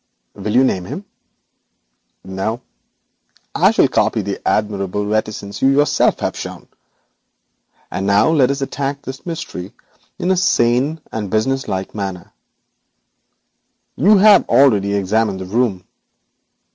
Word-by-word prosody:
'Will 105 +2 -4
you 130 - +6
name 95 -8 0
him?' 195 - -7 1.2
'No; 95 +5 -4 0.9
I - - +4
shall - - +3
copy 110 - 0
the 100 0 -4
admirable 105 -1 -1
reticence 105 -1 -3
you 135 - +4
yourself 145 +2 +2
have - - -2
shown. - - -8 1.2
And 95 +3 -3
now 100 +9 +4
let 140 -5 +3
us 140 0 -2
attack 140 +1 -4
this 135 +5 -9
mystery 160 - -6 0.4
in 185 - 0
a 190 - +2
sane 140 -2 +1
and 105 -3 -4
businesslike 110 -3 -1
manner. 95 -4 -6 1.6
You 205 +7 +5
have 205 0 +6
already 100 -7 +4
examined 100 0 0
the 95 - -6
room. 100 -2 -1
110 Hz, 120 wpm, -18 LUFS, 100-140 Hz, 1.6 s, you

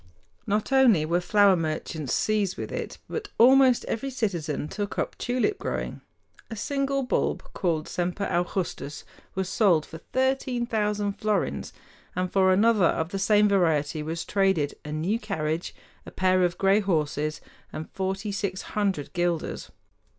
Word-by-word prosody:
Not 210 +5 0
only 245 - +5
were 170 +3 +1
flower 200 +1 +5
merchants 155 -3 -3
seized 210 -3 0
with - - -5
it, - - -5
but 435 -2 -4
almost 260 +1 +6
every 275 +5 -3
citizen 175 - -2
took 205 +4 -4
up - - -2
tulip 255 - 0
growing. - - -4 0.5
A 225 - -5
single 275 +3 -1
bulb 250 - 0
called 160 -4 -1
the - - -10
"Semper 180 +3 -2
Augustus" 175 -5 -2 0.3
was 190 -1 -1
sold 185 -6 +3
for 160 - -10
thirteen 260 -2 0
thousand 210 -3 -1
florins, 215 -2 -1 0.4
and 185 0 -1
for 190 -1 +4
another 210 0 +4
of 160 0 -1
the 195 - -3
same 210 +1 +4
variety 160 -6 +1
was 160 +2 -4
traded 190 -7 +1
"a 150 - -7
new 170 +9 -1
carriage, 165 -6 -3 0.3
a - - -10
pair 185 0 +2
of 175 -1 +1
gray 195 +1 +4
horses, 155 -5 -1 0.3
and 155 - -6
forty 195 +2 -3
six 195 -1 -3
hundred 195 -8 -1
guilders." 175 -2 -2
195 Hz, 150 wpm, -26 LUFS, 165-215 Hz, 0.5 s, almost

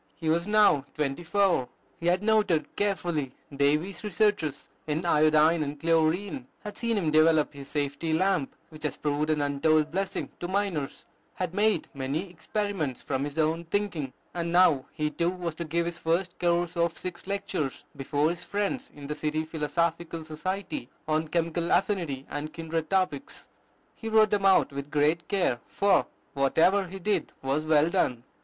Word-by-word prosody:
He 160 - -3
was 170 +3 +1
now 210 -10 +5
twenty 150 +2 -2
four. 180 -7 +2 0.3
He 170 - -3
had 180 +3 +2
noted 210 -7 +2
carefully 175 -9 -1 0.2
Davy's 150 +9 +1
researches 205 -7 0 0.2
in 155 +3 -1
iodine 155 0 +4
and 145 0 -3
chlorine, 165 - +1 0.2
had 210 -1 -6
seen 230 -2 -1
him 165 -6 +1
develop 155 -1 +4
his 140 -1 -9
safety 145 +2 -2
lamp, 180 -3 +1
which 155 -1 -13
has 150 - -2
proved 150 +1 -1
an 155 -1 +2
untold 150 +2 +2
blessing 195 +2 -2
to 175 - -3
miners, 185 -7 -2 0.3
had 180 -2 -3
made 210 +2 +2
many 145 +7 -3
experiments 180 - -3
from 130 +1 -1
his 145 +1 -5
own 160 +1 +1
thinking; 165 -7 -2 0.2
and 170 -1 -2
now 170 -7 +5
he 150 0 -2
too 170 +3 0
was 175 -3 -4
to 170 +2 -5
give 170 +2 0
his 170 0 -4
first 175 +2 -1
course 175 0 +1
of 170 0 0
six 180 0 -7
lectures 195 -8 -3
before 145 +3 +1
his 175 0 -6
friends 205 +7 -2
in 145 -1 -9
the 150 - -3
City 155 +1 -2
Philosophical 165 +1 -2
Society, 190 - -4 0.2
on 155 +1 +1
Chemical 170 +1 -1
Affinity, 165 -10 0
and 150 +1 -5
kindred 165 -1 -3
topics. 190 +8 -1 0.4
He 225 - -6
wrote 220 -1 +5
them 200 -2 +3
out 190 -6 +4
with 140 +1 -6
great 150 +3 +1
care; 180 - +1
for 200 0 +2 0.3
whatever 165 +8 +3
he 190 +2 -7
did 195 -2 -1
was 135 +3 0
well 155 +1 +4
done. 125 -7 +1
165 Hz, 165 wpm, -28 LUFS, 150-190 Hz, 0.4 s, now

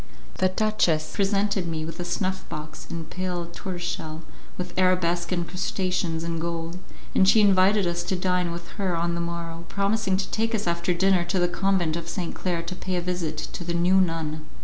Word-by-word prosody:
The 185 - +4
duchess 185 -6 +2
presented 200 -2 +1
me 160 -1 -2
with 165 - -7
a 175 - -2
snuff 190 +1 -1
box 155 0 -7
in 165 -1 -4
pale 180 -1 -3
tortoise 175 +1 -6
shell 160 -1 -4 0.3
with 180 -1 -5
arabesque 180 -2 +2
incrustations 180 -1 -1
in 165 -1 -2
gold, 170 +1 -3 0.3
and 190 - +5
she 220 - +7
invited 200 0 +5
us 175 0 0
to 190 - 0
dine 180 -1 +1
with 170 0 -6
her 185 -4 +1
on 170 +1 0
the 170 - -1
morrow, 170 0 -4
promising 200 -1 +1
to 190 -1 -3
take 225 +1 +1
us 210 - -2
after 170 +1 +1
dinner 190 0 +4
to 185 +2 -1
the 175 -1 +3
Convent 180 -3 +1
of 170 0 -4
St. 175 -1 -3
Claire 175 -3 -1
to 175 +2 -5
pay 185 0 -3
a - - +2
visit 175 -3 -2
to 155 +3 -5
the 170 0 -2
new 180 +3 +5
nun. 160 -3 -1
175 Hz, 195 wpm, -26 LUFS, 170-190 Hz, 0.3 s, she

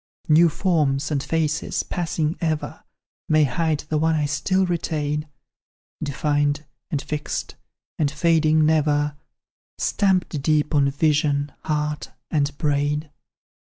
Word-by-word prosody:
"New 165 +1 +6
forms 150 -5 +1
and 140 -2 0
faces, 155 0 -1
passing 165 -2 -2
ever, 155 -2 -2 0.5
May 155 0 +5
hide 155 +3 0
the 155 0 -2
one 160 +1 +2
I 150 -1 +1
still 170 +7 +1
retain, 150 -3 -2 0.7
Defined, 145 0 0 0.2
and 150 -6 -1
fixed, 150 +1 -4 0.5
and 150 -3 +2
fading 155 0 +3
never, 150 -1 +2 0.6
Stamped 185 -7 +1
deep 150 +1 +1
on 140 -2 +4
vision, 145 0 +1
heart, 150 -1 -2 0.2
and 145 -2 0
brain. 150 +1 0
150 Hz, 115 wpm, -23 LUFS, 145-160 Hz, 0.7 s, New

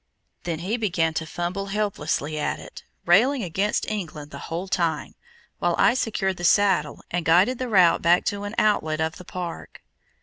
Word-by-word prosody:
Then 170 -2 -2
he 220 +5 0
began 175 -7 0
to 160 +1 -3
fumble 180 +4 -3
helplessly 170 -7 -2
at - - -1
it, - - -11 0.2
railing 235 +9 +4
against 195 +4 -1
England 155 -8 -5
the - - -8
whole 170 +4 -3
time, 165 -4 -1 0.5
while - - +1
I - - +5
secured 200 -6 -1
the 175 - -7
saddle, 185 -5 +2
and 175 0 -1
guided 185 +10 +3
the 255 -1 -3
route 185 -5 +5
back 175 +2 +3
to 205 0 -2
an 205 +3 -6
outlet 160 -7 +1
of 160 +1 -1
the 180 - -12
park. 175 -2 -7
180 Hz, 175 wpm, -24 LUFS, 165-205 Hz, 0.5 s, I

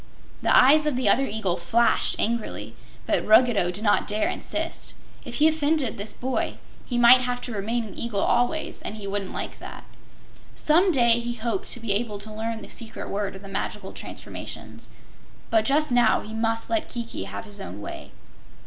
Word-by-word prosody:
The - - +4
eyes 300 +4 +6
of 295 - +1
the 250 -3 0
other 270 +6 +4
eagle 205 -4 -1
flashed 225 +8 +2
angrily, 230 0 -2 0.3
but - - +1
Ruggedo 220 -4 +5
did 190 +4 -5
not 205 - +3
dare 210 +1 0
insist. - - -4 0.3
If - - -6
he 305 - +5
offended 305 -7 +1
this 205 +1 -3
boy, 260 +1 -2 0.3
he 245 - -2
might 240 +1 +8
have 245 0 -2
to 245 - -5
remain 225 +4 -1
an 215 - -9
eagle 235 -4 -3
always 245 +6 0
and 215 - -5
he 210 -2 -8
wouldn't 195 -1 -3
like - - -6
that. - - -9 0.7
Some 350 +5 +3
day 240 -5 +4
he 240 0 -4
hoped 245 - -3
to 245 - -3
be 230 -3 -3
able 210 0 -2
to 215 +1 -9
learn 220 0 -4
the - - -9
secret 225 -2 -5
word 200 -1 -2
of 190 - -11
the - - -9
magical 195 0 -4
transformations, - - -9 0.6
but 220 -1 +3
just 295 +2 +2
now 245 0 +4
he 215 - -9
must 225 0 -1
let 330 -2 -1
Kiki 235 -1 -5
have - - -6
his 205 -1 -5
own 95 +4 -7
way. 105 - -8
230 Hz, 190 wpm, -25 LUFS, 210-250 Hz, 0.7 s, might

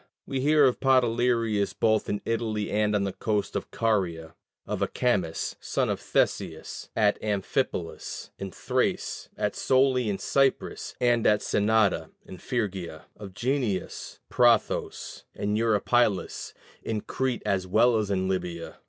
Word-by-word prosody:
We 135 - -3
hear 150 +2 +5
of 125 - +2
Podalerius 120 -5 +2
both 110 -1 +2
in 105 - -2
Italy 110 -2 -1
and 105 0 +1
on 100 - +1
the 95 -1 -2
coast 105 -2 -2
of - - -3
Caria; 85 -8 -1 0.3
of - - -3
Acamas, 95 -10 0
son - - 0
of - - -1
Theseus, - - -2
at 105 -2 +2
Amphipolus 100 -3 -2
in 95 - -4
Thrace, - - -2
at - - -1
Soli 130 -3 +2
in 100 - -1
Cyprus, 135 +4 0
and 120 -2 +3
at 105 0 +4
Synnada 105 -1 +2 0.2
in 95 - -10
Phrygia; 95 -9 -3
of 100 -3 -10
Guneus, 120 -4 -2
Prothous, 120 -3 +1
and 105 +1 -1
Eurypylus, 110 -1 +1 0.3
in 110 -2 -3
Crete 130 +1 -2
as 95 -2 0
well 115 +5 +4
as 105 -2 -1
in 95 -1 0
Libya. 90 -3 -3
105 Hz, 135 wpm, -27 LUFS, 95-120 Hz, 0.3 s, hear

